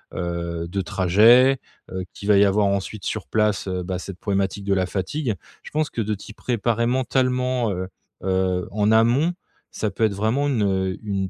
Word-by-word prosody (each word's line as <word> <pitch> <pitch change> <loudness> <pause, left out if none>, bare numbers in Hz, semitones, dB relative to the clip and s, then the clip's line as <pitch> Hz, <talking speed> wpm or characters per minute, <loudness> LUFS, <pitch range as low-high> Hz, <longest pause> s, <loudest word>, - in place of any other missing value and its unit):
heu, 85 -1 -3
de 100 +3 -2
trajet, 110 +10 +5 0.3
heu, 95 0 -3
qu'il 100 - -8
va 100 - +6
y 100 - +6
avoir 100 +1 +3
ensuite 100 +1 -2
sur 110 - -3
place, 105 -3 +1
heu, 90 -1 -2
bah, 90 0 -3
cette 95 -1 -8
problématique 100 0 -1
de 100 - +2
la 95 -1 +1
fatigue. 105 - -2 0.3
Je - - -9
pense 155 0 0
que 115 - -2
de 105 0 -1
t'y 105 +2 -11
préparer 115 0 0
mentalement, 125 -2 +1
heu 90 0 -3 0.4
heu, 95 -1 0
en 105 +1 +1
amont, 120 +10 +4 0.4
ça 110 - -2
peut - - -2
être 105 - 0
vraiment 115 +8 +1
une, 120 -7 +1
heu, 95 -2 0
une, 100 -2 -2
100 Hz, 190 wpm, -23 LUFS, 95-115 Hz, 0.4 s, va